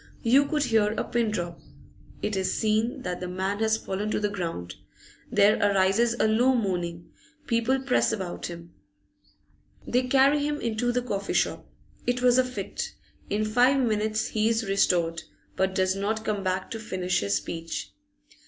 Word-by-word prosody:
You 270 +4 +4
could 300 0 0
hear 220 -4 +2
a - - -1
pin 235 -2 0
drop. 175 -5 -4 0.6
It 210 - -1
is 190 -1 0
seen 220 +2 0
that 180 0 -3
the 180 - -4
man 190 +3 -2
has 220 0 +2
fallen 205 0 -3
to - - 0
the 210 -1 0
ground; 165 - -4 0.6
there 205 +2 +5
arises 205 +4 +3
a 230 - +2
low 245 +4 +3
moaning; 175 -6 -2 0.3
people 235 +2 +1
press 265 -1 +2
about 190 -4 -4
him. 170 -1 -10 1.1
They 255 +1 +1
carry 275 +2 +4
him 295 0 -1
into 235 +1 -1
the 250 0 -1
coffee 200 -5 -3
shop. - - 0 0.4
It 245 0 0
was 250 0 +5
a - - +5
fit. 255 0 -5 0.3
In 210 +1 0
five 250 +5 +4
minutes 215 -3 0
he 220 0 +1
is 225 0 0
restored, 170 -4 +1 0.3
but 190 0 0
does 185 0 +2
not 215 +3 -2
come 205 -2 -1
back 185 0 -2
to 225 - -4
finish 185 -4 -1
his 100 0 0
speech. 165 +12 -4
215 Hz, 170 wpm, -26 LUFS, 185-240 Hz, 1.1 s, there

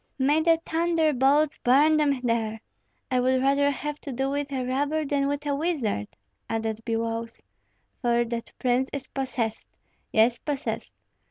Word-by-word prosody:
"May 290 +3 +3
the 330 0 +4
thunderbolts 310 -3 +2
burn 290 +5 +4
them 285 -4 +2
there! 225 -2 -1 0.5
I 255 - +3
would 260 +1 +2
rather 280 +2 +3
have 295 +1 -4
to 280 - -6
do 265 +2 -1
with 285 0 -2
a 260 -2 -2
robber 290 +4 0
than 275 0 +1
with 285 +1 -2
a 290 - 0
wizard," 280 - -1 0.4
added 225 -1 -2
Biloüs; 230 0 -3 0.6
"for 240 -1 +2
that 230 0 -5
prince 255 +1 +1
is 275 -2 -5
possessed, 255 -5 -3 0.4
yes, 230 +2 +3
possessed. 290 -3 -4
270 Hz, 150 wpm, -26 LUFS, 235-290 Hz, 0.6 s, the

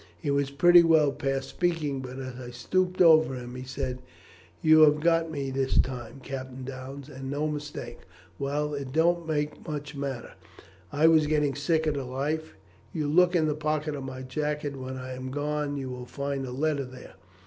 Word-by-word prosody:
He 140 - -1
was 140 -1 +1
pretty 175 +5 +7
well 160 -4 +4
past 135 -2 -2
speaking, 160 -6 -1
but 130 0 -7
as 130 -2 -6
I 120 -1 -7
stooped 180 +10 0
over 160 -5 +6
him 125 -1 -7
he 125 - -6
said, 130 -1 -4 0.6
'You 155 0 +6
have 150 -1 +6
got 165 +1 +2
me 140 -3 -3
this 135 0 0
time, 125 0 -1
Captain 130 -1 -6
Downes, 135 +1 -7
and 135 -2 -7
no 145 +2 -1
mistake. 150 -1 -6 0.4
Well, 150 +2 -1
it 140 -2 -4
don't 170 +2 +2
make 150 0 -2
much 150 -1 -5
matter; 140 -3 -4 0.6
I 150 +2 +2
was 160 -2 +6
getting 150 -2 +2
sick 160 +3 +1
of 155 - +1
the 140 -2 -3
life. 145 +5 -3 0.4
You 150 +1 -2
look 180 +4 +4
in 160 -2 +3
the 150 - +1
pocket 150 0 -1
of 140 - -5
my 130 0 -6
jacket 150 +2 -2
when 130 0 -6
I 130 0 -6
am 130 0 -6
gone, 150 +2 -1
and 145 0 -3
you 130 -2 -4
will 125 0 -7
find 140 -1 -3
a - - -6
letter 140 +1 0
there. 130 0 -12
140 Hz, 195 wpm, -27 LUFS, 130-155 Hz, 0.6 s, pretty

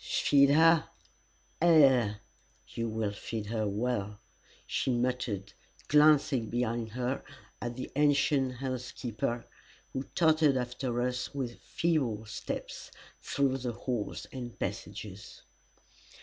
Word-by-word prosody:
"Feed 140 -1 +4
her? 160 +2 +5 0.7
Ay 135 -10 +5 0.5
you 115 0 -3
will 110 -2 -1
feed 105 +1 -5
her 110 0 -1
well," 105 -1 -2 0.5
she - - -1
muttered, 120 -5 -1 0.4
glancing 145 -6 +4
behind 120 -1 -1
her 125 +2 -2 0.4
at 120 0 -4
the 130 - -6
ancient 145 -2 +3
housekeeper, 120 -2 -3 0.5
who 130 - -2
tottered 155 -4 +4
after 125 0 -2
us 125 +2 -3
with 125 -4 -4
feeble 130 -11 0
steps 105 - -6 0.3
through 135 -2 0
the 125 -2 -3
halls 115 -2 -3
and 120 -3 -7
passages. 100 -1 -6
125 Hz, 105 wpm, -30 LUFS, 115-140 Hz, 0.7 s, her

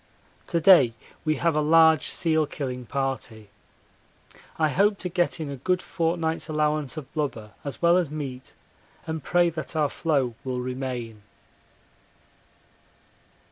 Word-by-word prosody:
To 170 - 0
day 155 -10 +6 0.3
we 155 -1 +1
have 165 -1 +1
a 150 - +2
large 160 0 +5
seal 160 -3 +1
killing 125 -4 -5
party. 120 -5 -4 1.1
I 155 -1 +2
hope 200 +5 +2
to 180 - -5
get 175 -1 0
in 150 -3 -4
a 140 - -6
good 180 +8 0
fortnight's 165 -2 -1
allowance 150 -3 0
of 150 -4 -8
blubber 120 -8 -3
as 140 +3 -7
well 170 +1 +5
as 175 -5 0
meat, 135 -4 -7 0.5
and 160 -1 -4
pray 175 -1 +2
that 155 0 -6
our 150 -2 +2
floe 140 -8 0
will 130 -2 -3
remain. 125 -3 -5
150 Hz, 140 wpm, -25 LUFS, 130-165 Hz, 1.1 s, day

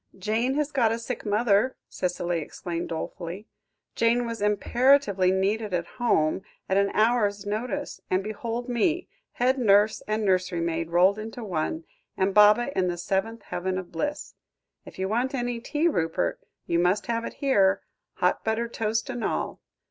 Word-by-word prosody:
"Jane 225 +7 0
has 300 0 0
got 240 -6 +2
a 230 - 0
sick 230 -1 -5
mother," 210 +3 +2
Cicely 175 -1 -2
explained 170 +2 -5
dolefully; 170 +4 -5 0.5
"Jane 235 +1 +2
was 230 -2 -5
imperatively 210 -1 +3
needed 195 +2 0
at 170 - -1 0.2
home, 160 -8 +2 0.3
at 190 - +1
an 200 0 +3
hour's 210 -3 +2
notice 240 +8 -3
and 185 +1 +1
behold 230 +3 -4
me, 310 +9 0 0.2
head 260 +2 +1
nurse 210 -2 +4
and 215 0 0
nursery 185 -2 +1
maid 165 0 -2
rolled 185 +4 +4
into 225 +2 -7
one, 165 -4 -2 0.3
and 190 +1 +1
Baba 210 +6 +5
in 185 -1 +2
the 175 -1 -2
seventh 195 +6 -2
heaven 185 +1 -3
of 185 -2 -6
bliss. 290 - -3 0.5
If - - -12
you 190 0 -1
want 245 +6 0
any 245 -2 -2
tea, 295 +7 0
Rupert, 165 - 0 0.3
you 170 - +1
must 185 +3 +2
have 230 +1 -1
it - - -5
here 200 -9 +2 0.3
hot - - 0
buttered 230 +1 -1
toast 220 0 -1
and 240 - -4
all. - - -2
210 Hz, 165 wpm, -26 LUFS, 185-235 Hz, 0.5 s, Baba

